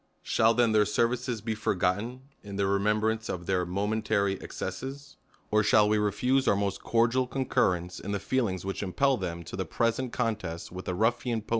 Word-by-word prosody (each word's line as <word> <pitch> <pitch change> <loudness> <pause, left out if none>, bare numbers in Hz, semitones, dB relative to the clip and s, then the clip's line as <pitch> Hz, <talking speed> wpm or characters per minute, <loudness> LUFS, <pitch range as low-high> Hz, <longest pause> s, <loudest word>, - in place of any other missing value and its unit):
Shall 115 +1 +3
then 120 -2 +3
their 105 -1 +4
services 120 +1 0
be 110 +1 -2
forgotten, 105 +4 -1 0.2
in 100 -1 -8
the 100 - 0
remem 100 +2 +2
brance 110 +1 -1
of 90 -1 -4
their 90 -1 0
momentary 100 +1 0
excesses? 135 +8 -6 0.3
or 105 0 +4
shall, 105 0 +5
we 105 0 +2
re 105 -1 +1
fuse 130 +6 +1
our - - +5
most 100 0 -1
cordial 120 +2 +2
concurrence 90 -9 0
in 100 - -5
the 100 - -1
feelings 110 -8 -1
v/hich 95 0 -3
impel 135 +8 +2
them 85 -3 -4
to 80 - -8
the 95 - -1
present 115 +7 -1
contest 105 -9 -3
v/ith 90 +1 -7
the 90 - -2
rulHan 115 +1 0
po - - -19
105 Hz, 190 wpm, -28 LUFS, 95-120 Hz, 0.3 s, shall